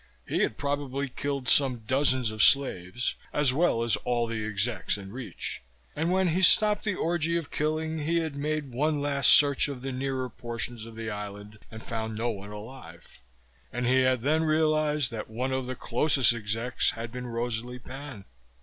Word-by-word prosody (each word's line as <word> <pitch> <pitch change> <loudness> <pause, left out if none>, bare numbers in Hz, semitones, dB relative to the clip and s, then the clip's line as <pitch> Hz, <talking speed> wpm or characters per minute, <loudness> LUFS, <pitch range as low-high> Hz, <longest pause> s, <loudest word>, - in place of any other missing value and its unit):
He - - -1
had 110 - +1
probably 140 -1 -2
killed 140 0 -3
some 130 -5 +3
dozens 130 -2 +2
of 110 -1 -2
slaves, 120 -4 +3 0.2
as 145 -4 +2
well 145 -6 +2
as 115 -2 +1
all 120 -1 0
the 115 -1 -3
execs 105 -2 -1
in 95 -1 -9
reach. 125 +1 -5 0.3
And 165 +3 0
when 190 -1 +3
he 175 +4 +1
stopped 210 +3 +5
the 205 -3 0
orgy 170 -1 0
of 165 -4 -5
killing 155 +1 -1
he 165 +3 +1
had 160 -3 -3
made 150 -1 -2
one 150 +4 +1
last 140 -1 +2
search 145 -1 +6
of 135 -3 -6
the 135 - -3
nearer 130 0 -2
portions 120 -1 -5
of 115 - -11
the 110 -1 -4
island 105 +1 -7
and 110 0 -10
found 110 -1 -4
no 120 +2 0
one 100 -1 -8
alive, 105 - -11 0.5
and 120 +1 -2
he 130 +2 +4
had 130 -2 +2
then 155 +3 +2
realized 155 -3 +2
that 110 -2 -6
one 125 +4 -2
of 130 -1 -2
the 130 - -4
closest 130 +1 +2
execs 115 +2 -1
had 115 0 -5
been 125 0 -6
Rosalie 120 +1 -3
Pan. 130 -4 -9
130 Hz, 185 wpm, -28 LUFS, 115-145 Hz, 0.5 s, search